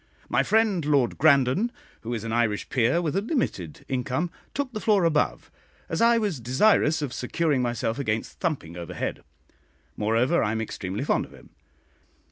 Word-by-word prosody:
My - - +3
friend 215 -6 +2
Lord 145 -4 +1
Grandon, 140 - +4 0.3
who 115 - -6
is 110 - -5
an 115 -1 -3
Irish 110 -3 0
peer 130 +8 +2
with 155 -1 -1
a 195 - +2
limited 205 - -3
income, 130 +6 -2 0.2
took 275 -2 -2
the 215 - -3
floor 210 -4 +3
above, 150 - 0 0.4
as 165 - -1
I 235 0 +5
was 205 - -1
desirous 150 - +3
of 130 -4 -4
securing 140 +2 0
myself 120 0 -1
against 110 -5 -3
thumping 140 - -2
overhead; 85 -2 -5 0.7
moreover, 115 +10 +2
I 105 - 0
am 110 - -2
extremely 100 +1 -4
fond - - +1
of - - -17
him. - - -17
135 Hz, 165 wpm, -25 LUFS, 115-175 Hz, 0.7 s, I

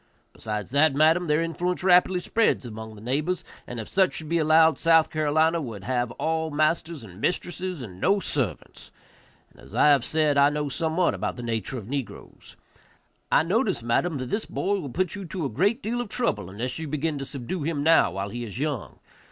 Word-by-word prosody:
Besides 105 0 -5
that, 145 +1 +3
madam, 160 +4 +4
their 150 +2 +2
influence 175 +3 -2
rapidly 180 0 +4
spreads 225 - +1
among 110 -1 -8
the 105 - -13
neighbors, 155 +9 -1 0.2
and 120 - -6
if 110 - -6
such 190 -1 +2
should 155 -1 -6
be 170 0 +2
allowed, 160 +1 +5
South 165 -1 +4
Carolina 155 +2 +2
would 110 -8 -7
have 120 +2 -1
all 160 +2 -1
masters 155 0 0
and 95 -1 -12
mistresses, 180 -3 -2
and 95 -5 -10
no 200 +3 +3
servants; 135 - -4 0.6
and, - - -19
as - - -13
I - - +5
have 140 -4 +4
said, 150 -1 +1
I 140 +1 +6
know 150 0 -2
somewhat 165 +4 0
about - - -3
the 120 - -7
nature 115 +1 -3
of 105 -4 -8
negroes; 135 -1 -7 0.8
I - - +5
notice, 195 - 0
madam, 145 +7 0
that 130 -1 -5
this 215 - -2
boy 200 +1 -1
will 145 -6 -6
put 180 +6 -1
you 200 - -6
to 175 -2 -4
a - - -1
great 200 - +1
deal 240 +3 -1
of 240 - -6
trouble 225 - -1
unless 120 +9 -4
you 160 - -4
begin 150 0 -2
to 135 - -4
subdue 140 +7 -5
him 145 -1 -2
now 165 +1 +5
while 95 +1 -3
he 120 +3 -5
is 110 -2 -7
young. 135 - -3
155 Hz, 205 wpm, -25 LUFS, 125-175 Hz, 0.8 s, I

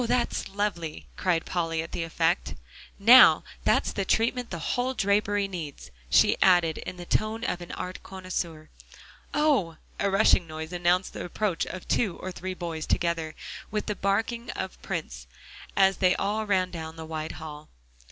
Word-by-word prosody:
that's 250 +1 0
lovely," 190 -6 -3
cried 175 -3 0
Polly, 165 -2 -1
at 165 - -10
the - - -3
effect. 165 - 0 0.4
"Now, 235 +6 +8 0.2
that's - - +3
the 195 - -2
treatment 235 +5 +1
the 175 - -4 0.2
whole 255 +1 -1
drapery 205 -1 +1
needs," 165 -7 -7 0.2
she - - +4
added 175 -4 +4
in 180 - -7
the 175 - -8
tone 215 +4 0
of 180 -6 -2
an 175 - -8
art 185 0 -6
connoisseur. 175 -4 -5 0.6
"Oh!" 275 - +2 0.2
A 200 - +2
rushing 195 -3 +4
noise 160 +1 -7
announced 175 +1 +1
the - - -5
approach 180 0 -1
of 185 - -7
two 200 -7 +1
or 185 - -6
three 185 +1 -5
boys, 165 -3 -5
together 165 -2 0 0.3
with 210 0 -2
the 210 - -2
barking 225 +5 -1
of 190 0 -5
Prince, 60 0 -5 0.5
as 195 -1 +4
they 185 -1 +3
all 210 +2 -1
ran 185 -2 +1
down 160 -1 -6
the 160 0 -8
wide 155 0 -4
hall. 155 -1 -9
185 Hz, 165 wpm, -27 LUFS, 165-205 Hz, 0.6 s, Now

